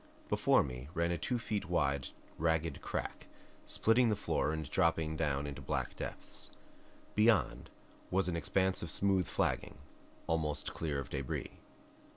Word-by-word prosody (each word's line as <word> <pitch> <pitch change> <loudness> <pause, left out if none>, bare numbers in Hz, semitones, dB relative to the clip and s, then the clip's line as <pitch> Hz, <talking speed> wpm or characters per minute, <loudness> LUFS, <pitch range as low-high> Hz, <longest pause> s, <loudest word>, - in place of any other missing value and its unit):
Before - - +4
me 65 0 -6
ran 85 0 +2
a 85 - 0
two 125 - 0
feet 105 -4 -2
wide 70 -6 +1 0.3
ragged 80 -1 +1
crack, - - -4 0.4
splitting 115 +2 +4
the 105 - +3
floor 100 -6 0
and 80 -2 -3
dropping 80 -1 +2
down 75 -3 0
into 70 -1 -5
black - - -2
depths. - - -6 0.6
Beyond 110 -1 +3 0.4
was 95 +1 +2
an 90 - 0
expanse 95 +4 +1
of 85 - -4
smooth 95 -1 +2
flagging, - - 0 0.5
almost 75 -2 -1
clear 75 -4 -2
of 70 - -6
debris. 70 -2 -3
80 Hz, 145 wpm, -34 LUFS, 75-95 Hz, 0.6 s, Before